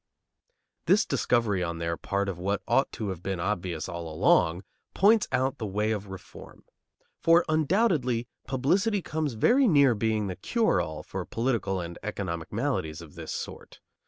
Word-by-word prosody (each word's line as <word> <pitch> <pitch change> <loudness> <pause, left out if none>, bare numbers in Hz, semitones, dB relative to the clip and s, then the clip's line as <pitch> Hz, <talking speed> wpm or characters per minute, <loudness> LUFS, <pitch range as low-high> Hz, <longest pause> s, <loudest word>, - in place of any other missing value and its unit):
This - - +4
discovery 110 -6 +1
on 85 -1 -3
their 85 0 -2
part 100 +3 -2
of 95 -3 -4
what 100 +3 -1
ought 130 +4 +2
to 105 -3 -4
have 90 -3 -5
been 95 -1 -3
obvious 85 -3 -2
all 85 -3 -6
along 80 +3 +3 0.3
points 210 +2 +5
out 130 +2 0
the 110 - -3
way 105 +2 0
of 105 -2 -3
reform; 95 -1 -11 0.6
for 165 +1 +5
undoubtedly 155 - +1 0.2
publicity 185 - +1
comes 155 -4 -2
very 245 - +4
near 140 - +5
being 110 -1 0
the 95 -2 -4
cure 230 - +1
all 80 -1 -5
for - - -5
political 115 -6 -1
and 85 0 -6
economic 90 -6 -4
maladies 80 -1 -2
of 75 - -14
this - - -7
sort. - - -7
105 Hz, 160 wpm, -27 LUFS, 90-140 Hz, 0.6 s, points